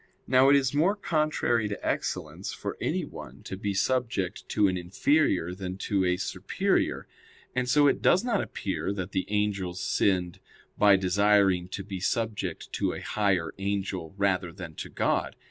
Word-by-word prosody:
Now 130 +1 +5
it 140 - +7
is 135 -1 +2
more 170 +8 +3
contrary 155 - 0
to 100 - -5
excellence - - -3
for - - -5
anyone - - -4
to - - -6
be 100 +1 -3
subject 115 -3 -1
to 105 -1 +3
an 95 - 0
inferior 90 - +1
than 95 0 -5
to 100 -1 0
a 90 0 +2
superior; - - -1 0.5
and 125 -1 0
so 145 +2 +5
it 140 - +3
does 185 - +4
not 235 -5 +1
appear 100 0 -3
that 95 -1 -5
the 95 - -1
angels 100 -4 -1
sinned 90 -3 0 0.4
by 100 -1 +6
desiring 95 -1 +3
to 100 +2 -5
be 95 -1 -6
subject 110 +3 -2
to - - 0
a - - -5
higher 100 -5 0
angel 95 -3 -3
rather 95 -3 +1
than 85 -2 -9
to - - -7
God. - - 0
100 Hz, 165 wpm, -28 LUFS, 95-120 Hz, 0.5 s, it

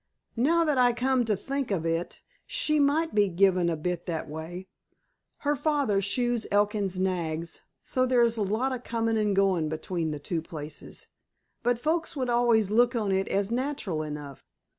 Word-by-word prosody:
"Now 325 +8 +3
that 295 -4 +1
I 245 -1 +5
come 250 0 +1
to 215 -2 +1
think 275 +6 -3
of 180 -5 -1
it, 165 +1 -2 0.3
she 305 0 +1
might 300 +3 +2
be 205 -2 +3
given 185 -1 +3
a 165 - -1
bit 175 +3 -3
that 165 -2 -3
way. 165 +5 -7 0.8
Her 290 +1 +3
father 280 -8 +1
shoes 240 +3 0
Elkin's 205 -2 +1
nags, 170 -3 -2 0.2
so 255 0 +1
there's 240 -2 +3
a 220 - -2
lot 220 +7 0
of 250 -1 -5
comin' 225 -1 -1
an' 210 -2 +1
goin' 190 -5 +2
between 160 +1 -3
the 150 - -3
two 160 +3 -3
places. 155 -2 -8 0.6
But 245 0 +1
folks 320 +7 -1
would 255 -3 -1
always 235 -4 +3
look 240 +3 +4
on 210 -4 0
it 190 0 +1
as 200 +2 0
natural 245 - -2
enough. 150 -2 -7
210 Hz, 175 wpm, -27 LUFS, 175-250 Hz, 0.8 s, I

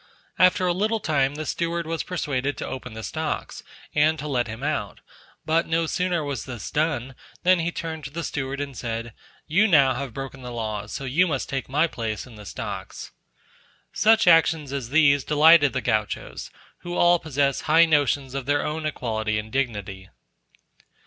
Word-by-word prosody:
After 185 0 +5
a 175 - +2
little 215 +5 0
time 145 -6 +1
the 155 +1 -5
steward 170 +1 -2
was 165 0 -2
persuaded 145 -6 -2
to - - -4
open 125 -3 -7
the 110 - -7
stocks, - - -4 0.3
and 155 +2 +3
to 150 - -5
let 125 -4 0
him 115 +4 -7
out, 145 -9 -2 0.5
but 160 +2 +1
no 165 0 +1
sooner 180 0 -1
was 140 -5 -4
this 120 -5 -7
done, 145 -4 -1 0.3
than 180 0 +5
he 165 +1 -1
turned 160 -3 -5
to - - -5
the 165 +4 -5
steward 135 -1 -3
and 140 -2 -5
said, 115 0 -4 0.3
"You 190 +8 +3
now 140 -8 +5
have 135 0 -5
broken 135 +2 -7
the 125 - -7
laws, 110 -3 -4
so - - -5
you 150 +8 +2
must 145 -5 -2
take 135 -2 -3
my 150 +5 +3
place 115 -9 -4
in 125 - -14
the 105 -2 -11
stocks." - - -6 0.8
Such 220 +1 +4
actions 160 -4 +4
as 135 -4 -4
these 140 -2 +4
delighted 150 -1 +6
the 130 - -2
Gauchos, 110 -4 -2 0.3
who 175 0 -5
all 175 0 +5
possess 140 -3 0
high 165 +2 +5
notions 145 -4 +1
of 135 -2 -4
their 145 0 +1
own 155 0 -2
equality 110 -6 -2
and 105 +1 -5
dignity. 105 -8 -3
145 Hz, 180 wpm, -24 LUFS, 125-165 Hz, 0.8 s, delighted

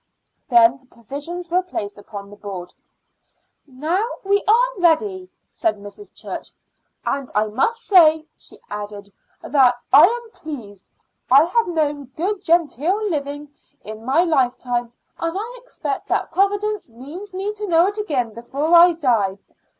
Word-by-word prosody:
Then 235 +1 +5
the 260 - -28
provisions 290 +10 -7
were 360 +1 +3
placed 210 - -5
upon 200 -1 -9
the - - -11
board. 190 -4 -8 0.9
"Now 310 +9 -1 0.2
we 400 +1 +2
are - - +3
ready," 365 +2 +1 0.2
said 335 -8 -1
Mrs. 205 - -11
Church; - - -7 0.6
"and 275 -2 -2
I 210 +1 +2
must 270 - 0
say," 320 -5 +5
she - - -13
added, 205 -1 -7 0.3
"that 250 -3 +3
I 295 +5 +9
am 470 +1 -4
pleased. 225 - -9 0.4
I 270 +4 +7
have 410 +7 +1
known 295 -4 -1
good 380 +4 -1
genteel 345 - +1
living 290 -1 -4 0.3
in 215 +1 -9
my 270 +8 +3
lifetime, 245 -6 0 0.3
and 330 +2 -2
I 485 +4 -7
expect - - -5
that - - -1
Providence 410 -1 0
means 295 - -10
me 395 +3 -2
to 420 0 -6
know 335 -1 +4
it 410 +2 -2
again 260 - -1
before 280 +8 0
I 345 +1 +8
die. 230 - +1
310 Hz, 145 wpm, -21 LUFS, 240-375 Hz, 0.9 s, I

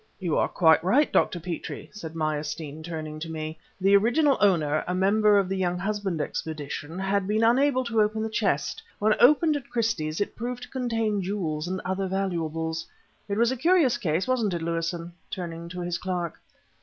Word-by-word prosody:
"You 175 -5 -1
are - - +2
quite 160 -2 +4
right, 260 +12 +3
Dr. 175 - +2
Petrie," 170 -1 -6
said 165 -6 -8
Meyerstein, 155 -1 -3
turning 155 -2 -6
to 165 +1 -5
me. 155 0 -5 0.2
"The 195 +1 +5
original 270 +8 +4
owner, 155 -7 +3
a 180 - -1
member 205 +2 +4
of 195 -2 +2
the 190 0 -2
Younghusband 185 0 -1
Expedition, 155 +1 -4
had 195 0 0
been 215 +2 +1
unable 255 +3 +3
to 230 -3 +1
open 215 +1 +1
the - - -1
chest. 195 -10 0 0.2
When 215 +1 +3
opened 300 +4 +5
at 275 - -10
Christie's 220 -10 -1
it 205 - -2
proved 245 +1 -4
to - - -10
contain 225 -5 -1
jewels 175 -5 -2
and 185 +1 -2
other 190 +1 -1
valuables. 165 -4 -2 0.4
It 200 - -1
was 235 +2 +3
a - - -1
curious 310 -1 +3
case, 165 +4 0
wasn't 230 -8 +1
it, 165 - -3
Lewison?" 165 +1 -3 0.2
turning 170 -2 -6
to 180 +1 -6
his 175 0 -2
clerk. 180 -3 -3
185 Hz, 180 wpm, -26 LUFS, 165-220 Hz, 0.4 s, The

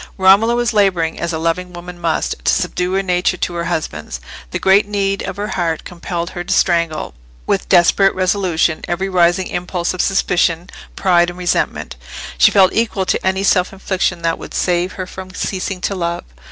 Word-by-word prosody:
Romola 200 +5 +5
was 240 -2 0
labouring, 185 -6 +1
as 170 - -2
a 160 - -2
loving 170 +3 -2
woman 175 0 -9
must, 165 -1 0
to - - +3
subdue 180 0 -1
her 195 0 +1
nature 180 0 +1
to 175 - -2
her 170 -1 -3
husband's. 150 - -4 0.3
The - - -3
great 195 +2 +4
need 195 -1 -1
of - - -5
her 205 +1 -3
heart 165 -3 -1
compelled 170 0 -5
her 175 - -5
to 190 - -6
strangle, 170 -4 +1 0.3
with - - -1
desperate 185 +3 +4
resolution, 185 -4 +1
every 190 +3 -2
rising 180 0 +3
impulse 175 0 -2
of 185 - -1
suspicion, 175 -3 +1 0.2
pride, 175 -2 +3
and 175 - -9
resentment; 175 - -1 0.4
she 65 - +7
felt 190 -2 +4
equal 220 -4 0
to 185 - 0
any 190 +1 0
self 185 -2 +2
infliction 190 -3 -2
that 165 0 0
would - - -9
save 180 0 0
her 185 - -5
from 185 0 -10
ceasing 190 -1 -3
to 200 - -1
love. 170 -2 -3
180 Hz, 185 wpm, -17 LUFS, 170-190 Hz, 0.4 s, she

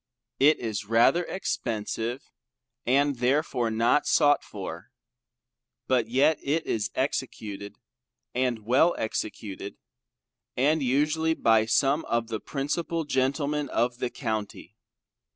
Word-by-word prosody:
It 150 +3 +5
is 110 -3 -4
rather 115 - +3
expensive 115 - -3 0.6
and 140 +2 +2
therefore 125 -1 +1
not 115 +6 +2
sought 145 -2 +4
for. - - -8 1.0
But 125 -4 +1
yet, 140 +6 +3
it 155 +4 -1
is 110 -2 -1
executed 100 -1 -3 0.6
and 125 -4 -1
well 135 +9 +4
executed, 105 -2 -4 0.8
and 150 +5 +2
usually 155 +5 +1
by 110 -4 +3
some 140 +6 +2
of 115 -1 -1
the 110 - -3
principal 165 +4 -2
Gentlemen 140 +1 0
of 120 +1 0
the 125 - -1
County. 110 -3 -5
125 Hz, 110 wpm, -27 LUFS, 115-145 Hz, 1.0 s, It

